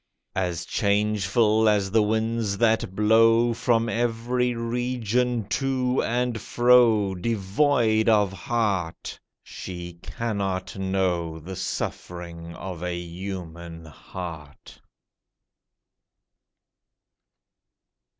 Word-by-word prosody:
As 90 -2 -2
changeful 105 +2 +2
as 100 -2 +1
the 110 +1 +4
winds 110 -1 0
that 110 -4 +1
blow 115 +2 +4
From 115 0 +1
every 120 +2 0
region 120 -1 -1
to 130 +1 0
and 120 -1 -1
fro, 120 -5 +4
Devoid 110 +3 +1
of 105 -3 +3
heart, 95 -4 -2 0.2
she 90 -2 -7
cannot 95 -5 -3
know 95 -4 -1
The 90 +4 -8
suffering 85 -2 -5
of 90 -2 -7
a 90 0 -2
human 85 -2 -7
heart. 80 -1 -9
105 Hz, 80 wpm, -25 LUFS, 90-115 Hz, 0.2 s, the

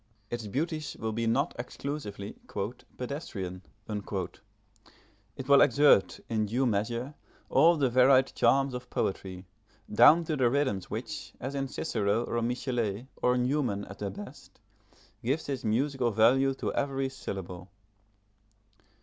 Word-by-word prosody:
Its 115 -3 -4
beauties 155 - -3
will 110 0 -2
be 115 +1 -1
not 135 +8 +1
exclusively 120 -6 -5 0.6
"pedestrian": 100 - -5 0.3
it 105 +2 -9
will 140 -1 +7
exert, 145 -9 +5
in 110 -2 0
due 125 +6 +1
measure, 120 +5 -1 0.4
all 165 +5 +5
the 140 -3 +2
varied 130 +2 +5
charms 135 +3 +3
of 125 0 -6
poetry, 95 -1 -3 0.5
down 150 +10 +7
to 160 -1 -2
the 130 -4 +3
rhythm 130 -7 +1
which, - - -6
as 135 +3 -4
in 135 -1 -2
Cicero, 110 -5 -1
or 120 0 -2
Michelet, 120 -2 -2
or 125 0 +2
Newman, 125 -5 0
at 100 - -11
their 100 - -2
best, 100 +1 -11 0.6
gives 135 +7 -1
its 135 -2 -3
musical 125 +3 +1
value 130 +5 +4
to - - -3
every 135 -1 -1
syllable. 95 -8 -7
120 Hz, 130 wpm, -29 LUFS, 105-135 Hz, 0.6 s, will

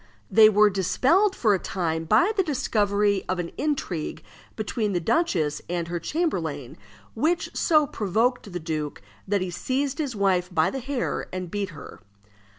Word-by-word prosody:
They 220 -1 +8
were 210 0 +5
dispelled 280 - +2
for 215 -4 +3
a 190 - +1
time 165 -4 -2
by 220 - +4
the 390 - +3
discovery 205 - +1
of 185 - 0
an 175 -1 -4
intrigue 270 - -3 0.3
between 215 -1 -2
the 175 - +1
duchess 165 - 0
and 170 -1 -2
her 175 0 -2
chamberlain, 165 - -2 0.4
which 320 +9 0
so 310 -3 +3
provoked 225 0 -1
the 175 - -4
duke 155 - -4 0.2
that 200 0 +1
he 185 -1 -3
seized 270 - -2
his 280 -6 -2
wife 190 -2 +1
by 160 -3 +2
the 270 - -4
hair 260 0 -3
and 185 -2 -5
beat 205 -2 -2
her. 150 -4 -11
205 Hz, 160 wpm, -25 LUFS, 175-260 Hz, 0.4 s, They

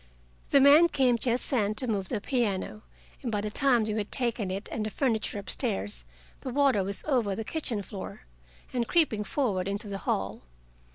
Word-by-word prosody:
The 280 - +6
men 290 +5 +8
came 250 -5 +2
just 245 +1 0
then 215 -5 +1
to 235 - +2
move 200 -5 -1
the 225 - -1
piano, 215 -4 -1 0.4
and 240 - -3
by 210 - 0
the 210 +1 -3
time 250 -1 +3
we 215 - -2
had 210 -1 -3
taken 235 -6 0
it 195 +3 -3
and 220 - -2
the 215 - -2
furniture 220 -3 -1
up 200 -2 -7
stairs, 95 - -2 0.3
the 260 - -6
water 265 -6 +3
was 195 +1 -2
over 240 -9 +1
the 225 - -4
kitchen 235 -6 -3
floor, 195 -1 -8 0.5
and 240 -2 0
creeping 290 -11 +2
forward 205 -7 -1
into 200 +2 -3
the 195 -1 -4
hall. 95 - -2
220 Hz, 190 wpm, -28 LUFS, 200-255 Hz, 0.5 s, men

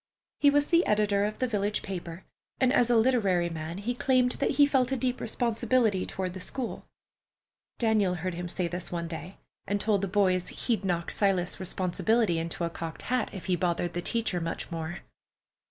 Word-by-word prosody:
He 285 - +6
was 290 +1 +2
the 340 0 +5
editor 205 -1 +2
of 210 +1 -3
the 255 - 0
village 205 -2 -1
paper, 175 -2 -6 0.4
and 260 0 +3
as 245 -3 +4
a 240 - +4
literary 205 -8 +3
man 160 +1 -5
he 215 +5 -2
claimed 250 0 +2
that - - +1
he 290 - +8
felt 265 -3 +2
a 265 - +1
deep 255 0 -1
responsibility 230 -3 +1
toward 185 -2 -3
the 185 - -7
school. 240 +6 -5 0.9
Daniel 215 -5 +2
heard 180 +1 -3
him 175 +1 -5
say 180 0 -1
this 175 +1 -4
one 170 -1 -3
day, 165 +3 -6 0.3
and 205 0 0
told 205 -2 +1
the 195 - -1
boys 185 -2 +2
he'd 230 -4 -2
knock 175 -3 -1
Silas's 190 -4 +1
responsibility 190 +1 +1
into 165 +1 -3
a 170 - 0
cocked 165 -1 -6
hat 255 - +1
if 190 - -8
he 185 - +2
bothered 175 0 -1
the 175 - -2
teacher 225 -2 -1
much 165 +1 -4
more. 165 +1 -4
195 Hz, 190 wpm, -28 LUFS, 175-235 Hz, 0.9 s, he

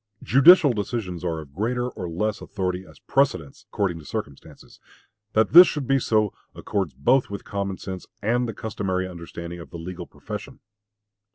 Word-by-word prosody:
Judicial 145 +2 +7
decisions 100 -5 -4
are 80 -3 -2
of 70 -3 -14
greater 120 - -1
or 90 -8 -6
less 105 +5 -2
authority 95 -2 -3
as 80 - -16
precedents 135 -2 -1
according 95 -7 -1
to - - -12
circumstances. 90 -11 -8 0.5
That 110 -1 +2
this 175 +2 +11
should 150 -3 -3
be 135 +1 +2
so, 110 -4 +1 0.2
accords - - -3
both 125 - +2
with 100 -1 -7
common 100 -2 -3
sense 95 -2 -7
and 120 +4 0
the - - -4
customary 95 -4 -2
understanding 85 -1 -8
of 85 - -10
the - - -8
legal 85 +2 -7
profession. - - -8
100 Hz, 165 wpm, -24 LUFS, 90-120 Hz, 0.5 s, this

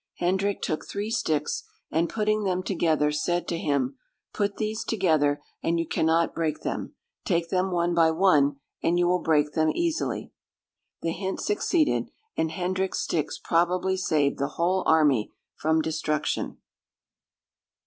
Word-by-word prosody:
Hendrick 190 +3 0
took 155 - -1
three 205 +2 -3
sticks, 155 -10 0 0.3
and 165 +2 +1
putting 215 -1 +1
them 185 -2 0
together, 160 -5 +1
said 175 +4 -1
to 170 - -1
him, 140 -3 0 0.4
"Put 205 -1 -1
these 220 +1 -2
together, 155 -9 +1 0.2
and 170 +1 +1
you 165 -1 -1
cannot 165 +1 +2
break 160 -2 -1
them; - - -4 0.3
take 170 -3 0
them 185 0 +1
one 175 -1 +1
by 165 -1 +5
one, 160 -5 +4 0.3
and 170 +1 +2
you 175 0 +3
will 180 0 +2
break 150 -2 +2
them 160 -1 +2
easily." 335 -1 -1 0.7
The 165 - 0
hint 190 +3 -3
succeeded, 305 - +1 0.3
and 160 - 0
Hendrick's 185 +3 -1
sticks 155 -4 -1
probably 180 +3 +1
saved 155 -7 +1
the 140 - +1
whole 180 +3 +2
army 145 -9 +4 0.2
from 160 +1 +1
destruction. 155 -1 -1
170 Hz, 145 wpm, -26 LUFS, 155-190 Hz, 0.7 s, by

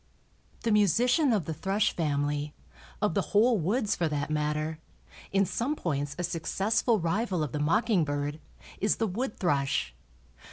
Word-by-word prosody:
The 230 - +1
musician 240 - +3
of 205 -8 +1
the 160 - -3
thrush 195 +6 0
family, 145 -2 -1 0.5
of 210 - +2
the - - +2
whole 225 +2 +3
woods 210 +6 0
for 170 - 0
that 145 0 -2
matter, 150 +1 -1 0.5
in 195 0 +3
some 245 - -1
points 145 - -2
a 180 - -2
successful 195 +7 0
rival 185 0 0
of 145 - -3
the 150 - -3
mocking 205 +5 +2
bird, 145 +1 -2 0.4
is 210 - +2
the 225 - 0
wood 220 +5 -3
thrush. 140 - 0
175 Hz, 155 wpm, -28 LUFS, 150-215 Hz, 0.5 s, musician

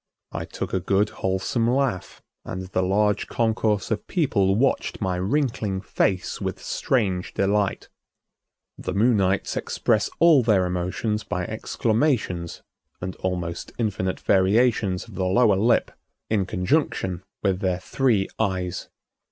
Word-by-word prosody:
I - - -4
took - - -6
a 95 - +2
good 100 +3 +1
wholesome 105 +6 -1
laugh, 130 -7 -1 0.2
and 95 0 -5
the 95 - 0
large 105 +2 +1
concourse 110 -2 0
of 110 - -2
people 100 - +2
watched 135 +5 0
my 95 -4 -1
wrinkling 105 -2 0
face 95 0 -1
with - - -3
strange 95 -8 -1
delight. 100 0 0 0.9
The - - -4
Moonites 100 -3 +2
express - - 0
all 165 -5 +6
their 105 -6 +3
emotions 90 +5 -2
by 90 -1 -3
exclamations 110 - -1 0.4
and 90 0 -5
almost 90 -2 -4
infinite 95 -5 -1
variations 100 0 +2
of - - -13
the 95 - -2
lower 105 +2 +4
lip 115 +5 +2 0.4
in 100 -4 +1
conjunction 95 - 0 0.2
with 95 -3 +1
their 95 -3 0
three 110 0 +1
eyes. 95 -4 -2
100 Hz, 125 wpm, -24 LUFS, 95-115 Hz, 0.9 s, all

